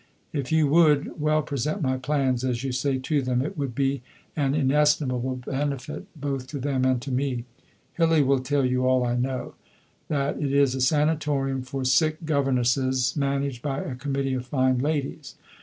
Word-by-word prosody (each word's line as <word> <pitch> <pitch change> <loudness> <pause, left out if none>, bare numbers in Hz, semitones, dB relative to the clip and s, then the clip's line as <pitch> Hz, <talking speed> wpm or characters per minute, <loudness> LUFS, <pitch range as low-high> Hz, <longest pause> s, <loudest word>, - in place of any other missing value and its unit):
If 140 -2 -3
you 160 -1 +4
would 150 -1 +3
"well 155 0 +2
present" 150 - -2
my 130 -1 +1
plans, 130 -2 0
as 125 -1 -1
you 135 - -2
say, 130 +2 0
to 140 +3 0
them, 125 -1 0
it 160 +7 -4
would 140 -6 -3
be 135 -1 0 0.3
an 140 -2 +1
inestimable 135 -3 +2
benefit 140 +5 -3
both 135 -2 -3
to 140 +1 -5
them 130 -1 0
and 130 -1 +2
to 140 - -5
me.... 125 -2 -1 0.5
Hillie 165 -3 +3
will 135 0 +3
tell 140 +1 0
you 125 0 +1
all 130 -1 +3
I 120 0 0
know 130 +1 -2 0.5
that 140 -1 -1
it 140 -2 0
is 140 -2 +3
a 130 - -3
Sanatorium 145 -1 +1
for 130 +1 -4
sick 155 +5 +2
governesses 130 -3 +1
managed 140 -3 -1
by 135 0 -2
a 135 - -5
Committee 135 +1 -2
of 125 -1 -3
fine 130 -1 +2
ladies. 145 0 -2
135 Hz, 175 wpm, -25 LUFS, 130-145 Hz, 0.5 s, you